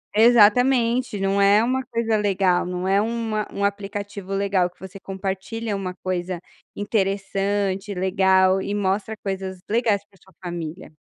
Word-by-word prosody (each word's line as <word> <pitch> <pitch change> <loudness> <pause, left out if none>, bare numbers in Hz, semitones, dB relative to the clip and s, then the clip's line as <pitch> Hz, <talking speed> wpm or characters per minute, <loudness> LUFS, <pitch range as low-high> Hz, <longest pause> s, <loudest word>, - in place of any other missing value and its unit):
Exatamente, 235 +1 +4
não 195 +1 +1
é 205 +2 +5
uma 260 +2 0
coisa 230 -2 0
legal, 190 -4 +1
não 180 +1 -3
é 195 +1 +3
um 225 -1 -2
a 215 - -1
um 200 - -3
aplicativo 200 -1 -4
legal 195 -2 +1
que 180 - -31
você 190 +1 -10
compartilha 195 +3 -4
uma 185 -2 -4
coisa 180 -1 -2 0.4
interessante, 200 -1 -1
legal 190 0 +3
e 200 +1 -3
mostra 205 +2 -1
coisas 190 -1 -4
legais 215 -3 +1
para 195 - -26
sua 190 - -22
família. 175 -1 -6
200 Hz, 145 wpm, -23 LUFS, 190-210 Hz, 0.4 s, é